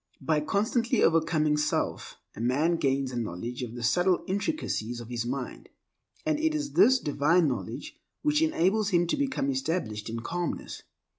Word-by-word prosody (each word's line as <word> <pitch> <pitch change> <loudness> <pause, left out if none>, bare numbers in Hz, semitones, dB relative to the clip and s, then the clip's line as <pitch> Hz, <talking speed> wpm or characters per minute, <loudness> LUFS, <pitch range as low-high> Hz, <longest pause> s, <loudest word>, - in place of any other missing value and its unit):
By 155 -1 +1
constantly 220 - +1
overcoming 160 -2 +3
self, 150 0 -1 0.2
a - - -6
man 145 +8 +2
gains 135 -2 0
a - - -6
knowledge 115 +4 -4
of 120 -1 -5
the 120 - -6
subtle 175 +10 +2
intricacies 190 - -2
of 120 -1 -9
his 120 -1 -3
mind; 130 0 -5 0.6
and 310 -1 +1
it 315 0 +1
is 295 -1 -2
this 260 +4 +6
divine 155 - +2
knowledge - - -5 0.2
which 300 0 +2
enables 215 - +2
him 175 -3 +3
to 170 - 0
become 280 0 0
established 160 - -2
in 115 +1 -4
calmness. 175 +7 -4
165 Hz, 160 wpm, -28 LUFS, -, 0.6 s, this